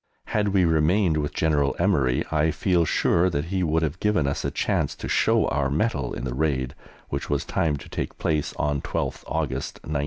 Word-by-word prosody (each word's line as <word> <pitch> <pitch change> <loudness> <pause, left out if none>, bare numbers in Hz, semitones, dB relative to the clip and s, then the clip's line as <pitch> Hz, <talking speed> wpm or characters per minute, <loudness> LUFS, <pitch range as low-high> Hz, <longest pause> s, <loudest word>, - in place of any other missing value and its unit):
Had 105 -1 +1
we 95 -2 +3
remained 80 +2 +3
with 75 -1 -1
General 75 -3 +1
Emery, 65 -3 +2
I 80 0 +2
feel 85 +1 +1
sure 85 +3 +2
that 75 -3 -2
he 95 - +1
would 80 -1 +1
have 75 -2 -2
given 105 -9 +2
us 70 - -1
a - - 0
chance - - -1
to - - -6
show - - +3
our 70 -2 0
mettle 70 - 0
in - - -5
the 65 -2 -3
raid 65 -3 0 0.4
which 70 - -4
was 70 -1 0
timed 75 -4 0
to - - -12
take - - -4
place 75 -2 0
on 75 -1 0
12th - - -3
August, 70 -5 -2
1918. 75 -1 -2
75 Hz, 205 wpm, -25 LUFS, 70-85 Hz, 0.4 s, we